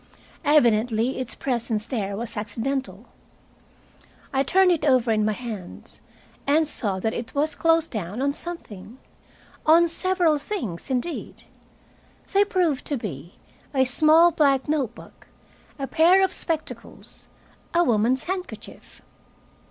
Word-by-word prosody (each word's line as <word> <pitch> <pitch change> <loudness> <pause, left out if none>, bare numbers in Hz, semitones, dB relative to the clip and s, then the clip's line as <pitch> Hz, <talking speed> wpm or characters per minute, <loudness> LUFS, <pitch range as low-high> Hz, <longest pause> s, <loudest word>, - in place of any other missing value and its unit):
Evidently 240 -3 +3
its 255 -2 -4
presence 235 -4 -2
there 200 -6 -3
was 230 0 -5
accidental. 230 +6 -3 1.3
I 270 - +2
turned 365 +6 +4
it 335 -5 0
over 255 -5 +3
in 215 -1 +2
my 215 0 +1
hands, 215 -6 -7 0.5
and 310 +2 +3
saw 200 -9 -1
that 220 +4 -1
it 235 - -6
was 300 +2 +1
closed 330 -1 +2
down 205 0 -4
on 280 +1 +1
something, 250 - -8 0.7
on 335 +2 +6
several 340 -2 +2
things, 280 - -5
indeed. 265 +6 -3 0.9
They 400 +1 +5
proved 360 -9 0
to 285 - -2
be 170 - -7 0.4
a 265 -1 +4
small 310 +6 +5
black 275 -4 +2
note 275 -6 -1
book, - - -15 0.5
a 275 - -3
pair 350 +7 +4
of 380 - +1
spectacles, 315 -2 -4 0.4
a 345 +1 +3
woman's 240 0 +2
handkerchief. 370 +1 -7
270 Hz, 130 wpm, -24 LUFS, 225-325 Hz, 1.3 s, on